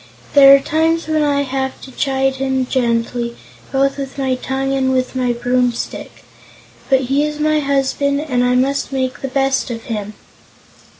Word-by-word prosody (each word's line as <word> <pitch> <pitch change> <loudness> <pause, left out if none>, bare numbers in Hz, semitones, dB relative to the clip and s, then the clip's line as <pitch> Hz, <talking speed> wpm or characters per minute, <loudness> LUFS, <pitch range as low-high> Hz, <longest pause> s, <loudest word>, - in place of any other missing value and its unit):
There 275 -1 +9
are - - +3
times 320 +3 0
when 310 -1 +1
I 285 -1 +1
have 265 0 -3
to 265 - -11
chide 270 0 0
him 265 -1 0
gently, 235 -1 -1 0.3
both 275 +1 +1
with 275 0 -6
my 265 -1 0
tongue 265 +1 -2
and 265 -1 +1
with 255 0 -1
my 250 -1 +1
broomstick. 245 0 -2 0.7
But 265 -1 +4
he 270 +3 +1
is 300 0 -3
my 305 0 +2
husband, 280 0 0
and 255 -5 0
I 250 0 +2
must 275 +2 0
make 260 -2 -2
the 270 - -3
best 270 0 0
of 230 -1 -5
him." 210 -2 -5
270 Hz, 170 wpm, -18 LUFS, 255-280 Hz, 0.7 s, There